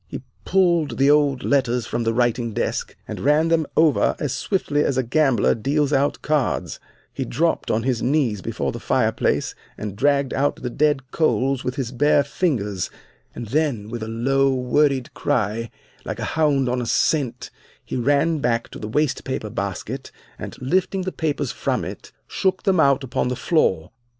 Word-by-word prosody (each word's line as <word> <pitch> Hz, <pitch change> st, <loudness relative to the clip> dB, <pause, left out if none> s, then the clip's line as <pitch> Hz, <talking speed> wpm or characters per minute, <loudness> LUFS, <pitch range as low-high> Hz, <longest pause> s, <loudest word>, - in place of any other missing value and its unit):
He -, -, -7 dB, 0.2 s
pulled 170 Hz, -9 st, +2 dB
the 140 Hz, +1 st, +5 dB
old 145 Hz, -3 st, +2 dB
letters 125 Hz, -4 st, +1 dB
from 120 Hz, 0 st, -2 dB
the 115 Hz, -, +1 dB
writing 120 Hz, -1 st, +1 dB
desk, -, -, -2 dB
and -, -, -6 dB
ran 150 Hz, +4 st, +3 dB
them 160 Hz, -3 st, +2 dB
over 155 Hz, -2 st, +3 dB
as 145 Hz, -4 st, -2 dB
swiftly 150 Hz, -1 st, 0 dB
as 135 Hz, -, 0 dB
a 130 Hz, -, +2 dB
gambler 135 Hz, -2 st, +2 dB
deals 145 Hz, +5 st, 0 dB
out 140 Hz, +1 st, +1 dB
cards; 150 Hz, -5 st, -1 dB, 0.3 s
he -, -, -3 dB
dropped 165 Hz, +6 st, 0 dB
on 110 Hz, +1 st, +1 dB
his 125 Hz, -2 st, 0 dB
knees 125 Hz, -7 st, +1 dB
before -, -, -2 dB
the -, -, -7 dB
fireplace -, -, 0 dB, 0.2 s
and 105 Hz, -2 st, -5 dB
dragged 140 Hz, +3 st, +1 dB
out 145 Hz, +1 st, +1 dB
the 125 Hz, -, -5 dB
dead 140 Hz, -2 st, 0 dB
coals 135 Hz, -4 st, +1 dB
with 125 Hz, -, -3 dB
his 130 Hz, -4 st, -3 dB
bare 145 Hz, +3 st, +3 dB
fingers, 110 Hz, -, -1 dB, 0.5 s
and 115 Hz, -, -6 dB
then 135 Hz, -7 st, 0 dB
with 120 Hz, 0 st, -5 dB
a 110 Hz, -, -4 dB
low, 135 Hz, +4 st, +1 dB
worried 130 Hz, +1 st, +1 dB
cry, 115 Hz, -4 st, -1 dB, 0.3 s
like -, -, -5 dB
a -, -, -3 dB
hound 145 Hz, -5 st, +2 dB
on 125 Hz, 0 st, 0 dB
a 120 Hz, -, -4 dB
scent, 140 Hz, -1 st, 0 dB, 0.3 s
he -, -, -5 dB
ran 145 Hz, +5 st, +2 dB
back 115 Hz, -3 st, 0 dB
to -, -, -10 dB
the 105 Hz, -, -5 dB
waste 150 Hz, +4 st, 0 dB
paper 110 Hz, -5 st, -4 dB
basket 100 Hz, +7 st, -4 dB, 0.3 s
and, -, -, -8 dB
lifting 185 Hz, +7 st, 0 dB
the 185 Hz, -, -3 dB
papers 145 Hz, -6 st, -2 dB
from -, -, -2 dB
it, -, -, -8 dB, 0.2 s
shook 190 Hz, -1 st, -1 dB
them 190 Hz, -4 st, +2 dB
out 140 Hz, -2 st, +4 dB
upon 125 Hz, -1 st, -1 dB
the 125 Hz, -, -1 dB
floor. 120 Hz, -, +1 dB
135 Hz, 180 wpm, -22 LUFS, 120-150 Hz, 0.5 s, the